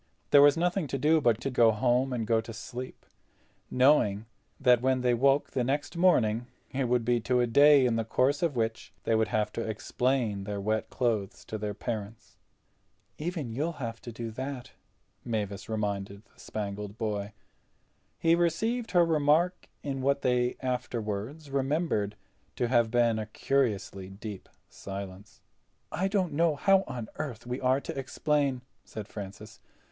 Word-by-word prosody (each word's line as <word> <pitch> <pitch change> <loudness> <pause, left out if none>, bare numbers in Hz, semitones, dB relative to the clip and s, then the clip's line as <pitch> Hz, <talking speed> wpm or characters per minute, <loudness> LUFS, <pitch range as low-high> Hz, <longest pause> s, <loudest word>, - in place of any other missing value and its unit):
There 145 - +8
was 145 +2 +6
nothing 175 0 0
to 135 - -2
do 155 +3 +3
but 120 -4 +3
to 135 - -2
go 120 -2 +5
home, 125 +4 +1
and 120 -3 -2
go 110 0 +2
to 115 +1 -9
sleep, 125 +4 -8 0.6
knowing 125 -6 +3 0.3
that 125 -3 +4
when 130 0 +2
they 125 -1 +2
woke 135 +4 +2
the 125 - 0
next 145 +5 -2
morning 120 -10 +3 0.2
it 135 0 -1
would 120 -1 +1
be 120 0 +2
to 125 +2 +1
a 120 - +3
day 140 +3 +6
in 115 -2 +1
the 115 - 0
course 130 +5 +1
of 165 -5 0
which 115 -1 -2
they - - +1
would 110 0 +3
have 105 0 -1
to - - -3
explain 110 -1 -1
their 105 -1 -3
wet 110 +2 -1
clothes 110 -6 -1
to 110 - -5
their 105 -1 -3
parents. 110 -1 -6 0.8
"Even 155 -6 -3
you'll 155 +7 -1
have 115 -6 -6
to 120 - -8
do 115 0 -6
that," 130 +2 -6 0.5
Mavis 105 -4 -3
reminded 100 -2 -3
the - - -28
Spangled 105 0 -5
Boy. 105 -2 -3 0.8
He 165 - +3
received 220 +8 +1
her 175 -1 +6
remark 160 +3 +2
in 135 -2 -3
what 140 +1 +1
they 125 -1 +2
afterward 125 +2 -3
remembered 135 - 0 0.4
to 120 - 0
have 120 -2 +3
been 115 -1 +2
a 110 - -4
curiously 105 -6 -1
deep 100 0 -8 0.2
silence. 100 0 -9 0.5
"I 185 +4 0
don't 195 -3 0
know 165 0 +2
how 195 +5 +3
on 120 -3 -5
earth 120 -7 -5
we 125 +2 -4
are 130 +1 +3
to - - -6
explain," 135 -1 0 0.2
said 105 -3 -8
Francis. 105 +1 -9
125 Hz, 165 wpm, -29 LUFS, 110-140 Hz, 0.8 s, There